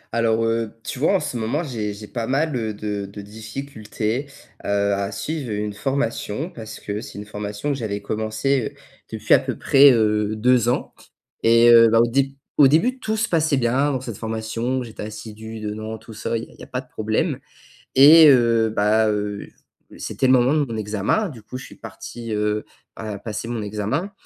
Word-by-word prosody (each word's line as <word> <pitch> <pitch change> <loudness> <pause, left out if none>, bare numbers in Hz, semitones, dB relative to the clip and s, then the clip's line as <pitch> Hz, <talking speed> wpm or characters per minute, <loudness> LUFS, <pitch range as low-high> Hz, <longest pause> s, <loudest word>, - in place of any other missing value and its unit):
Alors, 115 -1 +2
heu, 115 -1 -1
tu 130 - -6
vois 160 - +3
en - - +3
ce 125 - -4
moment 120 +9 -1
j'ai 115 -8 -3
j'ai 105 +1 -9
pas 115 0 -4
mal, 145 +3 0
heu, 110 -3 -2
de 105 -1 -4
de 100 - -8
difficultés, 110 +3 -5 0.4
heu, 100 0 +1
à 100 0 -2
suivre 130 +5 -4
une 105 0 -2
formation, 135 - -2
parce 110 -2 -9
que 105 +1 -4
c'est 110 - -10
une 105 - -7
formation 105 +5 -5
que 140 - +1
j'avais 105 -3 -3
commencée, 110 +4 -1
heu, - - -25 0.3
depuis - - +1
à - - +7
peu - - -4
près, 140 0 +6
heu, 105 -2 +1
2 120 +1 +3
ans 125 - -1 0.5
et 115 +1 +6
heu, 115 -1 +8
bah, 115 +1 +4
au 115 - +5
déb 135 +3 +1 0.3
au 145 - +8
début 225 - +2
tout 220 -2 -2
se 225 +2 +1
passait 155 -4 +2
bien 130 +4 +1
dans 130 -3 -2
cette 115 -6 -7
formation, 115 +3 -2
j'étais 115 -3 -9
assidu 110 +1 -8
dedans 110 +1 -5
tout 110 - -13
ça, 110 +2 -2
il 115 - -5
y - - -9
a - - -17
il - - -21
y - - -10
a - - -10
pas 125 0 -3
de 130 - -23
problème 110 0 -1 0.5
et 155 +4 +9
heu, 115 -4 +4
ben, 110 +2 +3
heu, 105 -1 -3 0.5
c'était - - -2
le 130 - +5
moment 130 +3 +4
de 150 -2 +2
mon 115 -4 -6
examen, 110 - -1
du 115 -7 -12
coup, 125 - -7
je - - -10
suis - - -13
parti, 115 -2 -8
heu, 105 0 -1 0.3
à, 105 -2 -6
passer 110 +1 -5
mon 120 -2 -3
examen 105 - -3
115 Hz, 210 wpm, -22 LUFS, 105-130 Hz, 0.5 s, et